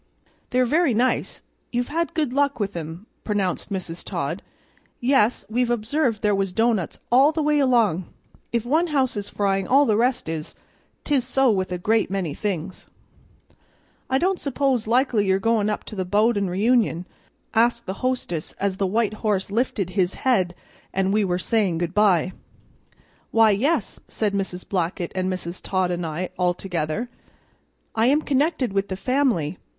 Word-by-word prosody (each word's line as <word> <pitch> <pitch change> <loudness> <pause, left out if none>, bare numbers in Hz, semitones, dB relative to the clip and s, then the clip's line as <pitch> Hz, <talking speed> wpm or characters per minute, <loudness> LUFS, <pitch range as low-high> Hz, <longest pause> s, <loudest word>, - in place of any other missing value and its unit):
"They're 255 0 +2
very 295 -1 +2
nice; 250 +3 0 0.3
you've 245 0 -1
had 335 +2 -2
good 300 -6 0
luck 280 -1 +1
with 200 -2 -2
'em," 165 +4 -6 0.2
pronounced 200 -4 -1
Mrs. 180 -3 -4
Todd. - - -3 0.6
"Yes, 245 -3 +2
we've 240 +2 0
observed 240 0 0
there 210 -1 +3
was 195 -1 0
doughnuts 225 -4 0
all 270 +5 +6
the 315 -1 -1
way 300 0 +3
along; 230 - +2 0.5
if 235 -1 -1
one 315 +7 +2
house 270 -6 +1
is 205 -1 -4
frying 195 -2 0
all 280 +3 +5
the 215 - +2
rest 250 +1 +1
is; 160 -1 -5 0.5
'tis 280 -4 +1
so 260 0 +3
with 190 -3 -1
a 180 - -1
great 220 +5 +1
many 185 -6 -2
things." 185 -1 -4 1.2
"I 265 - +3
don't 365 +5 +1
suppose 270 -4 0
likely 235 -3 +2
you're 190 0 +3
goin' 215 +1 +1
up 210 - -2
to - - -9
the 190 - -1
Bowden 205 +1 +2
reunion?" 205 -2 +2 0.5
asked 235 +1 +2
the 190 +1 -6
hostess 250 -11 -2
as 195 -1 -2
the 195 - +1
white 215 +2 +1
horse 200 -3 0
lifted 210 -5 -1
his 185 -1 0
head 185 -9 +2 0.4
and 195 +1 0
we 215 0 +3
were 180 -2 0
saying 195 -3 +1
good 170 +1 -2
by. 190 -4 +3 1.0
"Why, 225 -1 +5
yes," 275 +12 0
said 210 -2 -1
Mrs. 190 -2 -3
Blackett 175 -1 -2
and 185 0 -1
Mrs. 185 -1 -5
Todd 185 -2 0
and 175 -1 -2
I, 165 +4 -4
all 180 -1 +2
together. 175 +4 -3 0.9
"I 225 +1 +2
am 295 +4 +3
connected 285 - +1
with 200 0 0
the 190 - -4
family. 235 - 0
210 Hz, 165 wpm, -23 LUFS, 185-250 Hz, 1.2 s, all